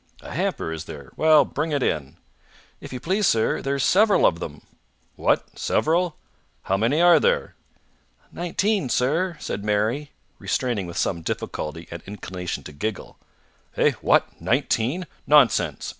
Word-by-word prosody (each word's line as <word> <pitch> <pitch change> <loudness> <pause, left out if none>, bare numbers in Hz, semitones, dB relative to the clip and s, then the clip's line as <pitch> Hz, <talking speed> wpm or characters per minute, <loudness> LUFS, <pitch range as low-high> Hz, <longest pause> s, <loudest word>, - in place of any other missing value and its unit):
"A - - -10
hamper, 80 - -2
is 80 0 -6
there? 70 -5 -10
Well, 155 -1 +5
bring 155 +3 -3
it 145 -3 0
in." 75 +1 -2 0.6
"If - - -10
you 130 - -5
please, 190 +7 +1
sir, 110 -1 +2
there's 140 -1 -1
several 205 +7 +4
of 85 - +3
them." 75 -3 -7 0.5
"What? - - 0
Several? 170 +1 +1 0.5
How 95 - 0
many 115 +10 +1
are 175 0 +7
there?" 485 0 +1 0.8
"Nineteen, 180 - -1
sir," 160 +9 0
said 100 - -4
Mary, 110 +8 0 0.3
restraining 115 -8 -1
with 85 - -7
some 85 -3 0
difficulty 80 0 -5
an 85 0 -7
inclination 90 -3 -6
to - - -9
giggle. 95 +8 -5 0.6
"Eh? - - +4
What? - - +2
Nineteen? 140 +12 0 0.2
Nonsense! 140 -6 +3
125 Hz, 145 wpm, -24 LUFS, -, 0.8 s, are